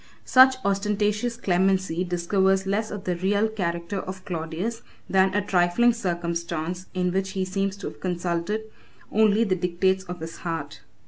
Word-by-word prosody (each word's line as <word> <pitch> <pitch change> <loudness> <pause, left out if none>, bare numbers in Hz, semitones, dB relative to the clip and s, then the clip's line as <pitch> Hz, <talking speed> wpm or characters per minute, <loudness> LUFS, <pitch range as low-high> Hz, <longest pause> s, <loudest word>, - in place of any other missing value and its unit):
] - - -35
Such 260 0 +7
ostentatious 210 +3 0
clemency 190 -3 +1
discovers 190 +2 +1
less 210 +3 0
of 205 -2 -6
the 180 -1 -1
real 200 +4 +2
character 180 -2 -3
of 185 0 -7
Claudius, 175 +7 -3 0.3
than 190 0 +3
a 205 -1 +1
trifling 185 +6 +3
circumstance 170 -3 -3
in 180 -1 +1
which 190 +1 -1
he 190 -2 -1
seems 195 +1 -2
to 200 - -6
have - - -9
consulted 175 +3 -2 0.5
only 220 +1 +4
the 195 -4 +1
dictates 185 +1 +1
of 180 -1 -7
his 165 +1 -7
heart. 165 -4 -5
190 Hz, 155 wpm, -25 LUFS, 175-205 Hz, 0.5 s, Such